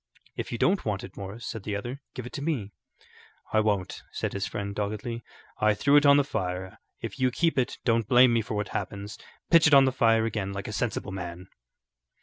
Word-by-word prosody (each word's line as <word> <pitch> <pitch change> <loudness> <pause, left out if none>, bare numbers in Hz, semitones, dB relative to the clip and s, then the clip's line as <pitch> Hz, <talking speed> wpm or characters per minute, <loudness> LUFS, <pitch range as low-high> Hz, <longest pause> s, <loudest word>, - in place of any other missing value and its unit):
"If - - -5
you 120 - -2
don't 190 - +2
want 105 -3 -2
it, 95 - -10
Morris," 100 +4 -7
said 115 - -5
the 105 +1 -3
other, 120 +7 -5
"give 125 - -5
it 125 - -9
to 140 - -4
me." 135 -10 -2 0.8
"I 110 - +5
won't," 105 -4 0
said - - -3
his 100 -1 -2
friend, 100 0 -4
doggedly. 105 +3 -3 0.4
"I 105 0 +3
threw 140 +7 +3
it 145 0 +6
on 140 0 +8
the 145 - +4
fire. 95 -5 -4 0.2
If 115 +3 -6
you 130 0 +3
keep 165 +6 +1
it, 130 -1 0
don't 115 -3 +2
blame 125 0 +6
me 115 - +3
for 110 0 -5
what 105 -1 -2
happens. 100 +1 -5 0.3
Pitch 165 -2 +7
it 145 - +6
on 135 -1 +8
the 130 - +2
fire 115 -3 +3
again 100 -3 -2
like 100 0 -5
a 105 - -5
sensible 105 -4 -2
man." 90 -1 -7
110 Hz, 220 wpm, -27 LUFS, 100-125 Hz, 0.8 s, on